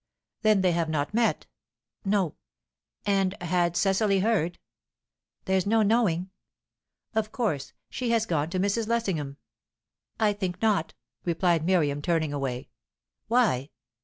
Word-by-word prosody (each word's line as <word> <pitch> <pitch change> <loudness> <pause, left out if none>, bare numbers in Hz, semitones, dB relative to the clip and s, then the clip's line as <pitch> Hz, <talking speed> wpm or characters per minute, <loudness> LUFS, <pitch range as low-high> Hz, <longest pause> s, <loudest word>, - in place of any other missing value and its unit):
"Then 215 -3 +4
they 185 -1 +3
have 165 -1 0
not 150 +2 -1
met?". 225 -7 +1 0.6
"No." 195 -5 +1 0.7
"And 195 -1 +1
had 175 -1 +1
Cecily 195 0 +2
heard?" 185 -6 +1 0.9
"There's 190 0 +1
no 220 +1 +4
knowing." 195 -5 +2 0.8
"Of 220 -1 -1
course, 205 - -2
she 250 -2 -3
has 230 -1 +2
gone 160 -6 0
to 185 - -2
Mrs. 205 +3 0
Lessingham." 185 -12 -1 0.8
"I 215 -2 +3
think 185 -3 -3
not," 210 -7 +1 0.3
replied 170 -1 +1
Miriam, 155 -5 +2
turning 160 -2 0
away. 135 -3 -3 0.6
"Why?" 215 - +2
190 Hz, 125 wpm, -27 LUFS, 165-215 Hz, 0.9 s, Then